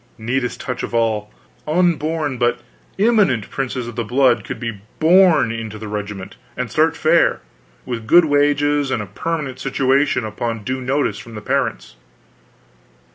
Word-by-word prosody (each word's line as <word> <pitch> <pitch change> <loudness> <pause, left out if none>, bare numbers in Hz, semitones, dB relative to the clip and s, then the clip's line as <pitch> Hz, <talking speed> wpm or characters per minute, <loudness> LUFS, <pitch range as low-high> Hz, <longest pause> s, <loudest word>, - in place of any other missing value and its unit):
Neatest 125 +2 -2
touch 125 -1 -4
of - - -4
all: 110 -2 0 0.4
unborn 155 -4 0
but 120 0 +1 0.4
imminent 200 - +2
princes 130 -2 -3
of 120 - -8
the 120 - -1
blood 125 +2 +2
could - - -6
be 115 -4 -5 0.2
born 170 - +5
into 110 -2 -5
the 110 0 -7
regiment, 105 -2 -6 0.2
and - - -3
start - - +2
fair, - - +3 0.5
with 115 -3 -5
good 175 +6 +6
wages 145 -1 +2
and 115 -5 -1
a - - -7
permanent 135 - -4
situation, 135 -1 +1
upon 115 0 -4
due 130 +4 -3
notice 135 +3 -1
from 115 -1 -11
the - - -5
parents. 60 -10 -2
125 Hz, 150 wpm, -19 LUFS, 115-145 Hz, 0.5 s, good